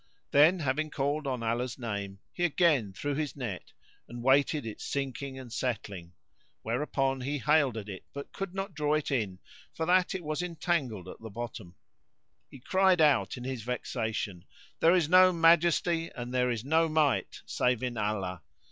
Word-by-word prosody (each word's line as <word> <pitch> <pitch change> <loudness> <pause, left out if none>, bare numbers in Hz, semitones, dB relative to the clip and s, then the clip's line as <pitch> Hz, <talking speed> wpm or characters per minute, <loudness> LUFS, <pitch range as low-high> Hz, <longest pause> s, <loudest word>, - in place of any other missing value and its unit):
Then, 155 +6 +6
having 150 +2 0
called 145 +1 -1
on 130 -3 -2
Allah's 120 +1 -1
name,[FN#64] 100 -5 -4 0.2
he 175 - -3
again 155 - +3
threw 145 +9 -3
his 150 0 -3
net 115 -10 -6 0.4
and 120 0 -8
waited 140 +1 +3
its 110 - -7
sinking 135 -1 -4
and 125 -3 -9
settling; 100 -9 -4 0.5
whereupon 135 +2 -1
he 140 +3 -2
haled 145 -3 +2
at 105 -2 -6
it 95 -2 -7
but 140 0 -8
could 195 -2 -5
not 195 -1 -4
draw 150 -1 +1
it 155 -1 -2
in 105 -8 -1 0.4
for 160 - -2
that 180 +2 +3
it 185 - -4
was 155 +2 -2
entangled 160 - -2
at - - -9
the 110 - -8
bottom. 110 -5 -7 0.7
He 135 - -12
cried 190 +5 +3
out 150 -3 +3
in 125 - -7
his 130 -2 -4
vexation 110 -6 -3 0.4
"There 165 +2 +5
is 175 -5 +2
no 185 +2 +7
Majesty 165 0 +3
and 120 -1 -6
there 125 0 +2
is 120 -1 -3
no 160 +3 +3
Might 155 -3 +1
save 125 -1 0
in 125 -1 -2
Allah!" 100 -5 -2
135 Hz, 175 wpm, -29 LUFS, 115-155 Hz, 0.7 s, no